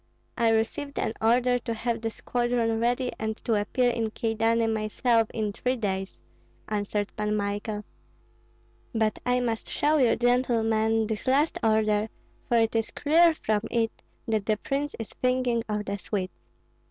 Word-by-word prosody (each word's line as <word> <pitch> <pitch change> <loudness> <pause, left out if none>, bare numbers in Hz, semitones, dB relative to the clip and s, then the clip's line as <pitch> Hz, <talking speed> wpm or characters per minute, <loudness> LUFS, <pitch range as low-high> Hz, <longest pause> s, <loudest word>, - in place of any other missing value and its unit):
"I 230 -1 +3
received 225 +6 -1
an 220 - -1
order 245 +2 +3
to 235 -1 -4
have 230 0 -2
the 225 - -1
squadron 240 -1 -1
ready 245 +2 +1
and 220 0 -2
to 230 - +1
appear 245 +4 +2
in 225 -2 -1
Kyedani 225 +1 +1
myself 225 +1 +1
in 215 -2 -2
three 255 +5 -1
days," 195 -4 -3 0.5
answered 205 -1 -2
Pan 210 0 -1
Michael. 205 +1 -2 1.1
"But 220 -1 +1
I 250 0 +3
must 230 -2 -2
show 305 +1 +2
you, 250 -5 +4
gentlemen 225 -3 +2
this 215 +1 -4
last 285 +5 +2
order, 215 -1 +2 0.4
for 235 - +4
it 225 0 +2
is 225 0 +1
clear 330 +2 +4
from 215 -7 0
it 230 -2 +1 0.4
that 215 -3 0
the 215 -1 +2
prince 280 +6 -2
is 225 - -6
thinking 250 -2 +1
of 210 0 -2
the 200 +1 -3
Swedes." 190 -2 -3
225 Hz, 155 wpm, -27 LUFS, 215-245 Hz, 1.1 s, you